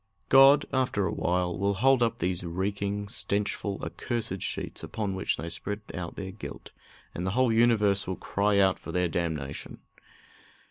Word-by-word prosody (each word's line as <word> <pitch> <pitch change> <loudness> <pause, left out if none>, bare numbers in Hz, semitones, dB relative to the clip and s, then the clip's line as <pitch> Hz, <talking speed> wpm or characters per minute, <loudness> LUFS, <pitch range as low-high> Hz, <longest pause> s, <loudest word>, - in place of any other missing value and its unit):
God, 135 +2 +7
after 130 -7 +1
a 85 - -1
while, 90 -1 0
will 100 +2 0
hold 130 +5 +4
up 115 -1 +2
these 90 -2 -1
reeking, 100 +3 -2
stenchful, 100 0 -2
accursed 115 -7 -3
sheets, - - -4
upon 105 -3 -3
which 95 - -1
they 80 - -5
spread 85 +5 -4
out 85 0 -5
their 95 -1 -5
guilt, 105 - -9 0.4
and 85 - -4
the 95 - 0
whole 130 -3 +4
universe 105 -4 +3
will 95 - -2
cry 100 +2 0
out 95 -1 +3
for - - -8
their 90 0 +1
damnation. 80 -4 -3
100 Hz, 165 wpm, -28 LUFS, 90-110 Hz, 0.4 s, God